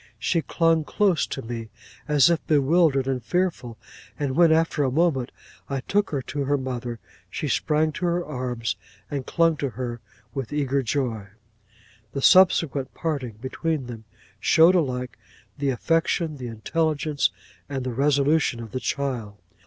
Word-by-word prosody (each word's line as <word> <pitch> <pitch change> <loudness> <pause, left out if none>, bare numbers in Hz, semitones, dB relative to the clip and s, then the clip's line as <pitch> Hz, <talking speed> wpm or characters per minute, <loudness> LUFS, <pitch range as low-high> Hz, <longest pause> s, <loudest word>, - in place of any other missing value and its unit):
She 170 - 0
clung 165 0 +2
close 190 0 +1
to 135 - -5
me, 115 -1 -6 0.4
as 150 0 +5
if 170 - 0
bewildered 145 -1 +3
and 130 -3 -1
fearful; 145 - -1 0.4
and 140 -3 -1
when, 170 0 +5
after 160 -2 +2
a 135 - +2
moment, 135 -3 +1 0.4
I 135 -1 -2
took 205 +8 0
her 140 -3 -2
to 140 +1 -3
her 145 +1 +2
mother, 125 -3 -4 0.3
she - - -4
sprang 155 0 +1
to 180 - -4
her 175 0 0
arms, 125 -5 -3 0.4
and 140 -3 -3
clung 165 -2 +2
to 140 - -2
her 120 0 -5 0.3
with 135 -4 -4
eager 140 -2 0
joy. 115 -5 -2 0.9
'The 140 - -2
subsequent 165 -7 +4
parting 140 -8 -3
between 150 +2 -2
them, 115 -2 -9 0.3
showed 165 +3 +5
alike 125 -8 -1 0.4
the 140 -1 0
affection, 165 +3 0
the 125 -2 -6
intelligence, 150 +6 0 0.4
and 135 -2 -3
the 125 -1 -3
resolution 140 0 +2
of 115 -2 -8
the 130 - -3
child. 125 -8 -3
140 Hz, 155 wpm, -24 LUFS, 125-160 Hz, 0.9 s, as